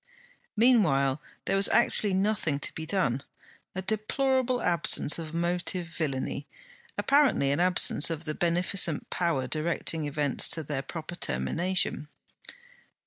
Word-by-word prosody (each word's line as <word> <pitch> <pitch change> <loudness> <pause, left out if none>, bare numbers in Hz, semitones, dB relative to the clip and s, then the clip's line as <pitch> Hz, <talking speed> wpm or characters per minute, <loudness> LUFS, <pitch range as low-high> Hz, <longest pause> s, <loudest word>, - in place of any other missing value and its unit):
Meanwhile 155 - +2 0.2
there - - 0
was 195 +1 +4
actually 205 -3 +3
nothing 190 -7 -1
to - - -3
be 160 0 -7
done: 155 -9 0 0.5
a 185 - -4
deplorable 250 +5 -1
absence 170 -4 +2
of 160 -2 -7
motive 175 +1 -2
villainy; 145 -3 -4 0.5
apparently 275 - +2
an 145 - -1
absence 175 -4 +3
of 165 -1 -5
the 155 - -3
beneficent 175 -1 +2
Power 170 -7 -1
directing 160 +2 -1
events 145 -2 0
to 160 - -1
their 145 -2 -4
proper 160 +4 -8
termination. 175 -3 0
170 Hz, 125 wpm, -27 LUFS, 150-190 Hz, 0.5 s, was